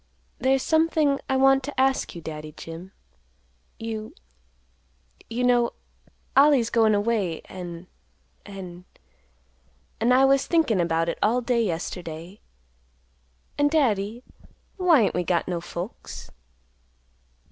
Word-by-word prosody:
"There's 265 0 +2
something 315 -3 +2
I 265 - +2
want 270 0 +5
to 285 0 -5
ask 265 -6 +1
you, 170 - -7
Daddy 155 -1 -7
Jim. 165 +5 -9 0.9
You—you 225 - -9
know—Ollie's 245 +2 +1
goin' 220 -2 +4
away, 205 -5 0
an'—an'—an' 180 +1 -11 1.3
I 260 +2 +6
was 275 0 +3
thinkin' 305 - +2
about 165 -1 0
it 170 - -3
all 235 +4 +2
day 235 -1 +1
yesterday, 170 0 -5 1.2
an', 290 - +4
Daddy, 235 -7 +1 0.5
why 350 -8 +5
ain't 205 - +2
we 180 - 0
got 175 0 0
no 175 -2 -2
folks?" 175 +4 -8
225 Hz, 105 wpm, -25 LUFS, 180-270 Hz, 1.3 s, I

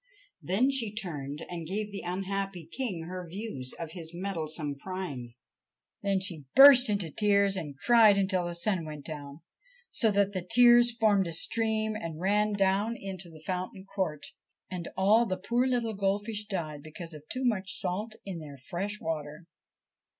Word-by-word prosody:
Then 235 +9 +2
she 240 -6 -1
turned 150 -8 -5
and 170 -2 -6
gave 205 +3 -3
the 200 - -5
unhappy 195 -1 -3
King 220 -11 -3
her 180 +2 -6
views 170 - -5
of 165 -2 -6
his 170 -1 -7
meddlesome 160 -6 -3
prying. 145 -11 -6 0.7
Then 200 -1 +1
she 170 -6 -2
burst 270 -3 +10
into 200 -6 0
tears 200 +1 +3
and 150 -7 -5
cried 220 - +6
until 190 -2 +1
the 175 - -4
sun 175 0 0
went 150 -2 -8
down, 145 -1 -7 0.5
so 225 - +3
that 200 -1 +2
the 185 - -2
tears 240 +4 +5
formed 205 -5 +3
a 165 - -4
stream 220 +4 +1
and 165 -6 -5
ran 210 +3 +2
down 200 +3 +1
into 190 -2 -6
the 155 -1 -14
fountain 190 +2 -4
court, 185 -7 -3 0.5
and 180 -2 -5
all 215 +5 +4
the 185 - -2
poor 235 +7 0
little 240 -3 0
goldfish 205 +2 -1
died 155 -7 -4
because 165 +2 -8
of 150 - -9
too 260 0 -2
much 205 -4 +1
salt 205 +5 -3
in 190 -4 -5
their 145 -3 -10
fresh 190 +10 -4
water. 155 0 -5
190 Hz, 165 wpm, -29 LUFS, 165-210 Hz, 0.7 s, burst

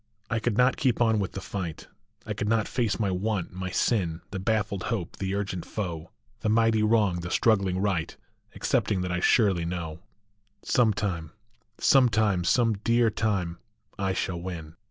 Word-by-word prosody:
I 110 - +1
could 110 -1 -1
not 125 +1 +4
keep 130 -4 +1
on 110 -2 +3
with 100 - -2
the 95 - -5
fight; 95 -4 -5 0.4
I 110 - -3
could 105 0 -2
not 110 -2 +2
face 110 -7 -1
my 100 -3 +1
want, 95 -1 -2
my 95 0 -4
sin, 90 -4 0
The 95 - -4
baffled 100 -1 -1
hope, 100 -8 -3
the 95 0 -2
urgent 95 -3 -3
foe, 85 -6 -5 0.3
The 110 - -1
mighty 115 0 +3
wrong, 105 -5 +2
the 85 0 -5
struggling 100 -3 +2
right, 95 -5 -1 0.4
Excepting 100 -4 0
that 90 0 -2
I 90 - 0
surely 95 -3 +3
know 85 -2 -4 0.6
Some 120 -3 +3
time 90 -6 -3 0.4
Some 130 -3 +5
time, 105 -5 +2
some 115 +5 +3
dear 115 -1 +3
time, 100 -6 -1 0.4
I 95 -1 0
shall 90 -2 -2
win. 85 -3 -7
100 Hz, 175 wpm, -27 LUFS, 90-110 Hz, 0.6 s, Some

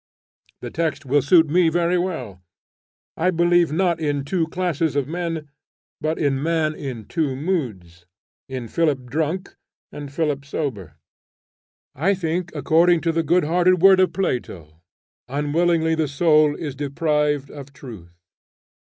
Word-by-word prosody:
The - - -6
text 155 -3 -2
will 140 +2 +2
suit 165 +4 +5
me 170 +2 +3
very 175 +2 +1
well. 130 - -4 0.7
I 175 +3 +1
believe 175 -1 +3
not 170 0 +1
in 145 -3 -1
two 165 +1 0
classes 165 -4 -1
of 140 -2 0
men, 165 -2 -4 0.5
but 155 +1 -1
in 135 -3 0
man 160 -1 0
in 130 -8 -7
two 145 -1 -1
moods, 110 - -4 0.4
in 130 -3 -5
Philip 145 -3 0
drunk 160 +5 -2 0.3
and 145 -1 -8
Philip 145 -2 -1
sober. 120 - -5 1.0
I 200 +1 +1
think, 170 0 -3
according 165 +4 +3
to 165 - +1
the 165 0 0
good 170 +3 +2
hearted 175 +3 +2
word 195 -1 +7
of 185 - +3
Plato, 85 - -4 0.5
"Unwillingly 160 +4 +1
the 160 -1 0
soul 150 0 +3
is 150 -4 -5
deprived 145 0 -1
of 140 -1 -10
truth." 110 -11 -12
155 Hz, 140 wpm, -22 LUFS, 140-170 Hz, 1.0 s, word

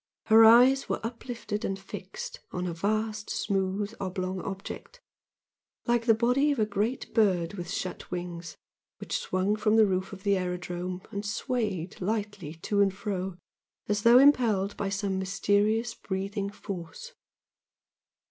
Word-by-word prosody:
Her 220 +1 +7
eyes 250 +4 +7
were - - 0
uplifted 230 -2 -5
and 195 - -1
fixed 195 -1 -8
on 180 0 -3
a 175 - -2
vast, 215 +4 -1
smooth 195 +2 -1
oblong 185 -1 -3
object, 200 - -7 0.9
like 240 0 +1
the 225 - +6
body 250 +6 +3
of 285 - -1
a 215 - +3
great 215 +4 -2
bird 185 -6 +2
with 175 -3 -6
shut 185 - -4
wings, 175 -2 -6 0.4
which - - -4
swung 185 +3 0
from 215 0 +2
the 220 -1 +7
roof 190 -1 -1
of 195 -1 -10
the 200 -1 +3
aerodrome 180 0 -4
and 200 -1 -4
swayed 210 -5 -2
lightly 205 -5 -3
to 200 +5 0
and 195 -1 +2
fro 190 -3 -3 0.5
as 205 0 0
though 235 +3 +7
impelled 230 -8 +4
by 200 - -2
some 200 -1 -1
mysterious 205 +4 +1
breathing 200 0 -3
force. 200 - -8
200 Hz, 145 wpm, -28 LUFS, 185-220 Hz, 0.9 s, Her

